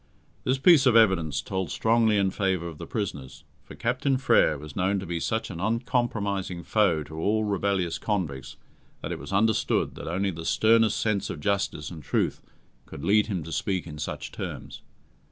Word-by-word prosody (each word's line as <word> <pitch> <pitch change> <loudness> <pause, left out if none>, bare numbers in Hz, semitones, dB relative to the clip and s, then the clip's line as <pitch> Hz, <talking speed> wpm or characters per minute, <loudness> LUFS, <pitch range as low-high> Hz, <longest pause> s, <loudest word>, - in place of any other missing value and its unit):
This 130 +1 +2
piece 140 -1 +6
of 120 - +4
evidence 95 - +3
told 95 -3 -3
strongly 110 +3 +2
in 95 -1 +2
favour 95 -4 -1
of 80 -3 -9
the - - -7
prisoners, 80 - -5 0.2
for - - -12
Captain 130 +3 0
Frere 125 - +3
was 75 +1 -10
known 95 +1 +1
to 95 - -6
be 85 -1 -3
such 110 +6 -2
an 85 - -7
uncompromising 105 -5 -1
foe 95 -8 +2
to 80 +2 -9
all 110 +6 +1
rebellious 100 -4 -1
convicts 70 -11 -3 0.5
that - - -4
it - - -4
was 70 - -9
understood 110 +3 +1
that - - -8
only 95 +4 0
the 80 -1 -7
sternest 110 +4 +3
sense 105 -3 0
of 85 - -5
justice 95 -4 -1
and 80 -3 -8
truth 70 - -1 0.5
could 70 - -9
lead 105 +1 +3
him 95 -7 -3
to 80 - -8
speak 95 +2 -1
in 75 -3 -9
such 75 - -5
terms. - - -7
100 Hz, 185 wpm, -26 LUFS, 85-110 Hz, 0.5 s, piece